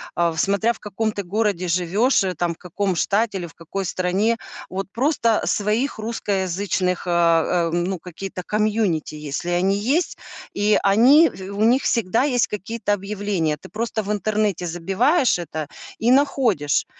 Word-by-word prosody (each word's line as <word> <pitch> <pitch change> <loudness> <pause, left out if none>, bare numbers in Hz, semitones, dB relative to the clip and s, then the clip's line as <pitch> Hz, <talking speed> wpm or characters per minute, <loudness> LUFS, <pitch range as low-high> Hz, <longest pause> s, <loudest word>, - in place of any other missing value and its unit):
А, 170 -1 +2
в 160 - -8
смотря 200 +6 +2
в - - -16
каком 215 +1 -2
ты 200 - -4
городе 195 -1 -1
живешь, 190 +8 +2
э, 185 - -1
там, 170 +1 -1
в - - -18
каком 185 +2 -2
штате 210 +2 +1
или 175 - -4
в 165 - -16
какой 190 +4 -5
стране. 185 +6 0 0.3
Вот 195 +1 -4
просто 235 -3 +1
своих 215 +7 0
русскоязычных, 195 -4 -2
а, 170 0 +2
ам, 175 +1 0
ну, 190 +1 -2
какие-то 180 +2 -7
комьюнити, 210 -8 0
если 150 +3 -4
они 190 +3 +2
есть. 275 - 0 0.4
И 210 +1 +3
они 250 +11 +6
в 190 +1 -9
у 205 - 0
них 255 +3 +3
всегда 230 +1 +1
есть 250 -4 +2
какие-то 210 +1 -3
объявления. 195 -6 -2
Ты - - -14
просто 220 +3 -3
в 205 - -3
интернете 210 -3 0
забиваешь 195 - +1
это 155 -3 -5 0.3
и 235 +2 +2
находишь. 250 - +2
200 Hz, 160 wpm, -22 LUFS, 175-220 Hz, 0.4 s, они